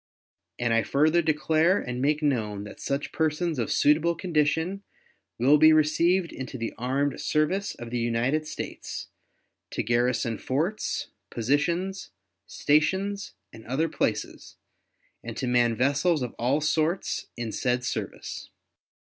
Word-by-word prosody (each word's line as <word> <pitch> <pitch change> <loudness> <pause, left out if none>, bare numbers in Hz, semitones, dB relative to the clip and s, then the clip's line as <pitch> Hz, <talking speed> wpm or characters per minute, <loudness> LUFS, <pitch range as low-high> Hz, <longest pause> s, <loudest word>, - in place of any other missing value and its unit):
And 120 -1 0
I 115 - +4
further 155 +7 +3
declare 160 +3 +2
and 125 0 -4
make 150 +2 +1
known 110 -8 0
that 105 - -10
such 140 +1 -2
persons 160 -1 0
of 115 - -1
suitable 160 +3 +3
condition 165 +2 0 0.6
will 140 +5 +5
be 155 +1 +8
received 170 +4 +3
into 130 0 -6
the 115 -1 -4
armed 135 +4 -1
service 180 +7 0
of 120 0 -9
the 120 - -1
United 120 +7 0
States, - - -6 0.6
to - - -2
garrison 120 0 +1
forts, 165 +11 -2 0.2
positions, 170 - -1 0.4
stations, 190 +7 +1 0.2
and 110 -1 -11
other 140 +7 +1
places, - - -3 0.7
and 115 -1 -7
to 130 - -2
man 120 -2 +3
vessels 140 +5 +2
of 120 - -4
all 130 +6 +1
sorts 160 +4 0
in 120 -2 -3
said 125 +3 0
service. - - -5
145 Hz, 130 wpm, -26 LUFS, 120-160 Hz, 0.7 s, be